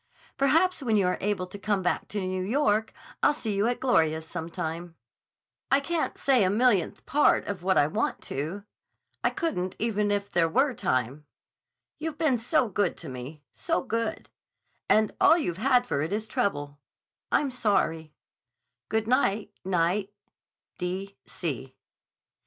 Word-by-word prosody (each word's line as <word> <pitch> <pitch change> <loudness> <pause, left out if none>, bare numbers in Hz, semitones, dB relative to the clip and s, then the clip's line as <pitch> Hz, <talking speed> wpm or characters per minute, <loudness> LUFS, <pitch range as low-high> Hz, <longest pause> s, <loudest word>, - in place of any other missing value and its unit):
Perhaps 325 +6 +3
when 225 -5 +2
you 195 - +3
are 180 - 0
able 200 -2 0
to 190 +3 -10
come 200 -1 0
back 180 - 0
to 210 - -3
New 185 -1 -2
York 220 0 +1 0.3
I'll 295 - +4
see 220 -7 -3
you 200 +3 +1
at 245 - -1
Gloria's 160 -11 +2
some 165 0 -5
time. 170 0 -5 0.7
I 275 - +5
can't 325 +3 -2
say 260 -6 +3
a 185 - +3
millionth 210 -3 +2
part 295 +2 +3
of 200 -3 -4
what 190 +1 +2
I 145 - +5
want 155 - -1
to. 160 +9 -4 0.6
I - - +4
couldn't 185 - -2
even 210 -2 0
if 200 0 -1
there 165 -1 +2
were 265 - +2
time. 130 - -1 0.7
You've 310 -1 -4
been 300 -7 +2
so 250 +3 +2
good 200 -3 0
to - - -9
me—so 145 - -4
good. 230 -3 -3 0.6
And 215 -1 +4
all 330 - +7
you've 180 - -2
had 250 +2 +3
for 140 - -1
it 155 - -2
is 215 +2 -1
trouble. 145 -9 -2 0.5
I'm 280 -3 +2
sorry. 165 -10 0 0.7
Good 220 0 0
night, 225 -5 +1
Knight. 185 +2 +1
205 Hz, 150 wpm, -27 LUFS, 175-250 Hz, 0.7 s, all